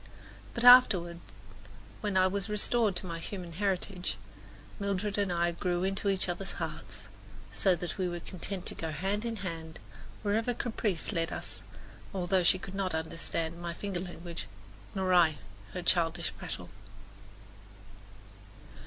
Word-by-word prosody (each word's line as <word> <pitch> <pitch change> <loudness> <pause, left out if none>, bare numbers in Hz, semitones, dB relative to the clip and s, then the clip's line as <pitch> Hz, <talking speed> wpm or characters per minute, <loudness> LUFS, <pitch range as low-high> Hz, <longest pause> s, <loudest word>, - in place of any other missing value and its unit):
But 235 - -1
afterward, 200 -9 +8 0.8
when 205 -3 0
I 185 - +6
was 200 +2 -1
restored 210 0 +2
to 180 - -4
my 165 -2 -4
human 180 0 -6
heritage, 185 0 -1 0.6
Mildred 200 0 -1
and 200 -2 +1
I 175 0 +2
grew 175 +1 -1
into 195 +1 0
each 190 -1 +1
other's 180 +2 -3
hearts, - - -6 0.5
so 190 -2 +3
that 175 +2 -5
we 185 - +2
were 175 0 -3
content 185 +2 -3
to - - +1
go 165 - -4
hand 195 +8 -1
in 230 -1 -1
hand 160 -2 -5 0.5
wherever 225 +4 +1
caprice 220 -8 -1
led 165 -3 0
us, - - -5 0.5
although 185 0 +2
she 175 +2 +5
could 190 +1 -8
not 195 -3 -1
understand 165 +1 -2
my 170 -1 -3
finger 195 -2 -3
language, 170 - -6 0.5
nor 190 -1 +2
I 165 -4 +6 0.4
her 180 - -4
childish 165 -2 +1
prattle. - - -6
185 Hz, 145 wpm, -31 LUFS, 170-200 Hz, 0.8 s, afterward